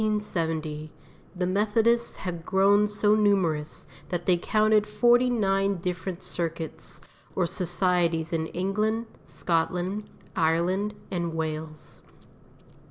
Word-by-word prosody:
IN - - +2
the - - +2
year - - +1
1770 160 -6 -3 0.4
the 180 0 -1
Methodists 220 +5 +2
had 175 -3 -5
grown 200 +3 +4
so 210 0 +2
numerous 190 -8 +1 0.2
that 175 -1 -3
they 180 - +4
counted 215 +3 +2
forty 240 +3 +4
nine 195 -4 +1
different 180 +1 -4
circuits 165 -2 -4 0.4
or 185 - +2
societies 175 -2 0
in 160 -1 0
England, 215 +6 -1 0.2
Scotland, 180 +4 -1 0.3
Ireland 180 +6 +1 0.2
and 170 -3 -2
Wales. 155 -1 -5
185 Hz, 115 wpm, -27 LUFS, 165-210 Hz, 0.4 s, grown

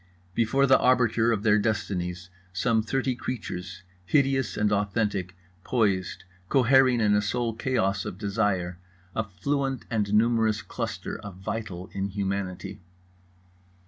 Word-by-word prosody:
Before 120 +6 +2
the 130 -1 +5
arbiter 120 -2 +3
of 105 -3 -1
their 105 -2 +4
destinies 90 -5 -2 0.2
some 110 +5 +1
thirty 130 +4 -1
creatures, 90 -8 -5 0.2
hideous 135 - +1
and 105 0 +2
authentic, 100 -3 0 0.3
poised, 95 -6 0 0.3
cohering 130 -1 +5
in 105 -2 +3
a 105 - +4
sole 115 +3 -1
chaos 100 -5 0
of 90 - -6
desire; 95 -4 -1 0.4
a 110 - +1
fluent 135 +7 -2
and 105 -3 0
numerous 110 -1 +3
cluster - - -5
of 100 -3 -9
vital 95 -1 -5
inhumanity. 95 -2 -3
105 Hz, 120 wpm, -27 LUFS, 95-120 Hz, 0.4 s, the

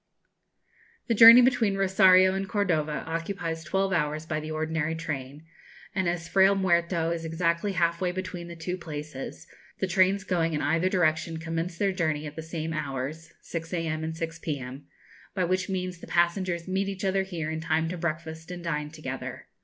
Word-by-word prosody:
The 230 - +1
journey 230 +2 +10
between 235 -6 +2
Rosario 185 -1 +5
and 195 0 -3
Cordova 160 -8 0
occupies 165 0 -3
twelve 190 +4 0
hours 155 -2 0
by 155 -1 -2
the 155 0 -6
ordinary 160 0 -1
train; 150 -2 -5 0.5
and 190 -3 +1
as 170 -1 -3
Frayle 195 +2 +5
Muerto 170 -3 +1
is 170 -1 -3
exactly 170 +4 0
half 170 -1 +1
way 180 -1 +1
between 180 -1 -5
the 170 - -8
two 180 +2 -4
places, 150 -4 -7 0.3
the - - 0
trains 190 +1 +3
going 165 -4 0
in 150 - -1
either 165 +3 +2
direction 165 -2 +1
commence 165 +2 -3
their 200 +1 +1
journey 155 -4 -1
at 150 0 -7
the 160 - -5
same 160 0 -4
hours 150 +2 -4
(6 165 -1 -6
a.m. 160 -2 -2
and 160 0 -4
6 165 0 -4
p.m.), 135 -3 -5 0.5
by 185 - +1
which 185 +2 0
means 185 -2 -3
the - - -11
passengers 175 0 0
meet 190 +1 0
each 195 0 -4
other 195 0 +2
here 170 -5 -4
in 160 0 -3
time 160 0 +1
to 180 - -3
breakfast 160 -1 -4
and 175 -1 -7
dine 150 -3 -2
together. 150 -4 -6
170 Hz, 180 wpm, -27 LUFS, 160-185 Hz, 0.5 s, journey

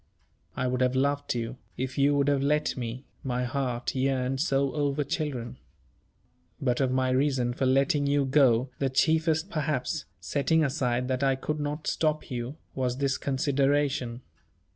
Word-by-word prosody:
I - - 0
would 125 0 0
have 130 0 +2
loved 140 0 0
you, 120 +1 -3 0.2
if 130 0 -3
you 140 +1 +3
would 140 0 +2
have 140 -1 +2
let 150 +2 +1
me, 125 +1 -5 0.2
my 125 -1 -1
heart 125 -1 -2
yearned 130 0 0
so 140 -4 +1
over 145 -1 0
children. 135 -5 -3 1.0
But 125 -1 0
of 130 - +2
my 130 0 +1
reason 130 -2 +1
for 130 +1 0
letting 140 +2 +2
you 140 0 +2
go, 130 -2 +3
the 135 - +1
chiefest 160 +6 +2
perhaps 150 -1 -1
setting 160 +3 +1
aside 125 -3 0
that 130 0 0
I 135 -1 +3
could 150 +3 -3
not 150 +1 -3
stop 155 -2 0
you 120 +3 -4 0.2
was 125 -1 -1
this 135 -1 0
consideration. 135 -2 0
135 Hz, 160 wpm, -28 LUFS, 125-145 Hz, 1.0 s, you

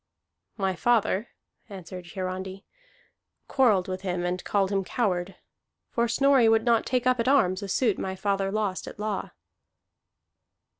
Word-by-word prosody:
"My 190 -2 0
father," 225 0 +1 0.4
answered 185 -2 -9
Hiarandi, 190 +1 -5 0.8
"quarrelled 220 -9 +3
with 185 0 -4
him 180 -2 -2
and 180 +1 -2
called 195 -1 0
him 195 -1 +1
coward. 185 -4 -1 0.6
For 235 0 +1
Snorri 260 0 +4
would 225 0 +3
not 235 -2 +2
take 250 -1 0
up 255 -1 +3
at 230 - 0
arms 195 -9 +3
a 200 - -5
suit 215 +1 +1
my 190 0 -3
father 195 0 -1
lost 205 -3 -2
at - - -9
law." 210 -2 -3
195 Hz, 145 wpm, -26 LUFS, 185-230 Hz, 0.8 s, Snorri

